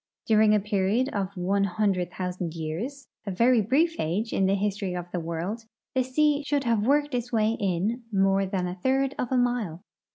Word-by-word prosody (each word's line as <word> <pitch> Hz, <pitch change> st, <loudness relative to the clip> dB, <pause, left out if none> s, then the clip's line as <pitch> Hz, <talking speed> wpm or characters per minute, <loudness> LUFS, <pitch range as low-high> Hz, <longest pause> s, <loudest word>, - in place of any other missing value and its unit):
During 215 Hz, -1 st, +5 dB
a -, -, +4 dB
period 210 Hz, +5 st, 0 dB
of 200 Hz, -3 st, -3 dB
one 195 Hz, +3 st, +1 dB
hundred 190 Hz, -2 st, 0 dB
thousand 180 Hz, -2 st, -4 dB
years 185 Hz, -, -5 dB
— -, -, -47 dB
a -, -, 0 dB
very 230 Hz, +5 st, +3 dB
brief 310 Hz, -, +1 dB
age 195 Hz, +8 st, -1 dB
in 190 Hz, -, +2 dB
the 195 Hz, -, +3 dB
history 195 Hz, -2 st, -2 dB
of 175 Hz, -1 st, -4 dB
the 180 Hz, -, -2 dB
Avorld 170 Hz, +7 st, -4 dB
— -, -, -67 dB
the 260 Hz, -, +2 dB
sea 290 Hz, +3 st, +2 dB
should 285 Hz, -1 st, 0 dB
have 230 Hz, -3 st, +2 dB
Avorked 290 Hz, +6 st, +2 dB
its 245 Hz, 0 st, -2 dB
Avay 220 Hz, -1 st, +2 dB
inunore 195 Hz, 0 st, 0 dB
than 190 Hz, -2 st, -1 dB
a 180 Hz, -, -3 dB
third 270 Hz, +2 st, +1 dB
of 250 Hz, -, -2 dB
a 260 Hz, -, +2 dB
mile. 235 Hz, -9 st, 0 dB
210 Hz, 200 wpm, -26 LUFS, 185-245 Hz, -, During